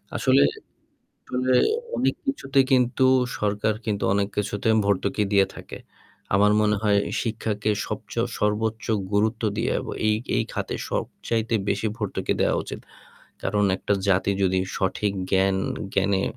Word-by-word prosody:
আসলে, - - +4 0.8
আসলে 130 0 -1 0.4
অনেক - - +1
কিছুতে 140 - -1
কিন্তু, 125 0 +3 0.3
সরকার 105 +1 0
কিন্তু 105 -2 -1
অনেক 100 0 +1
কিছুতে 105 +1 -1 0.2
ভর্তুকি 100 +1 +1
দিয়ে 100 -1 +5
থাকে। - - -9 0.6
আমার 105 +1 +5
মনে 105 -1 +2
হয় 105 -2 +3 0.2
শিক্ষাকে 110 -2 -2 0.2
সবচেয়ে - - -3
সর্বোচ্চ 110 +2 0 0.3
গুরুত্ব 110 +3 +1
দিয়ে। 115 - 0
এবং - - -6 0.2
এই 105 - +4 0.2
এই - - +2
খাতে - - -3 0.2
সবচাইতে 115 0 -2
বেশি 105 +2 0
ভর্তুকি 105 -3 -2
দেওয়া - - +2
উচিত। - - -7 0.6
কারণ 105 +1 +1
একটা 100 - -2 0.2
জাতি 95 +1 +3
যদি 95 0 +2 0.2
সঠিক 100 +1 0 0.2
জ্ঞান 95 0 +3 0.4
জ্ঞানে 95 0 +2
105 Hz, 130 wpm, -24 LUFS, 100-110 Hz, 0.8 s, দিয়ে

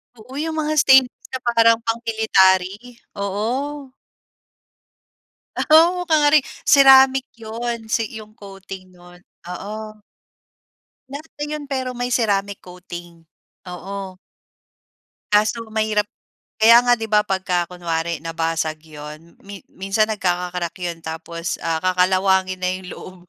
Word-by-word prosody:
Oo 235 +3 -15
yung 320 +1 -3
mga 310 -1 -1
stainlesss 265 -2 +4
na 260 - -2
parang 230 -1 +4
pang-military? 210 -5 +2 0.4
Oo. 255 +8 -3 1.8
Oh, 345 +3 +5
kunwari 300 -2 +4 0.2
ceramic 270 -1 +6
'yon 230 +1 -5
si 225 - +1
'yong 215 -1 -10
coating 195 -2 -11
no'n, 175 0 -17 0.3
oo. 215 +4 -7 1.1
Lata 290 +2 -8
'yon 295 -1 -6
pero 260 -2 -3
may 245 +1 -3
ceramic 200 -4 0
coating, 175 -2 -11 0.5
oo. 190 +1 -7 1.2
Ah, 210 - +6
so 230 +2 -3
mahirap 215 -1 0 0.5
kaya 230 +2 +8
nga 245 0 +4
'di 225 - -4
ba, 210 0 +5
pagka 185 -2 -1
kunwari 170 -2 -3
nabasag 165 -1 -2
'yun 155 +1 -12
mi 200 0 -9
minsan 195 +3 0
nagkaka-crack 180 -4 -2
'yun, 175 -1 -3
tapos 165 +1 -5
ah, 165 -1 -1
kakalawangin 185 +1 +2
na 180 - +1
'yung 185 0 -8
loob. 185 - -11
200 Hz, 115 wpm, -20 LUFS, 180-240 Hz, 1.8 s, kaya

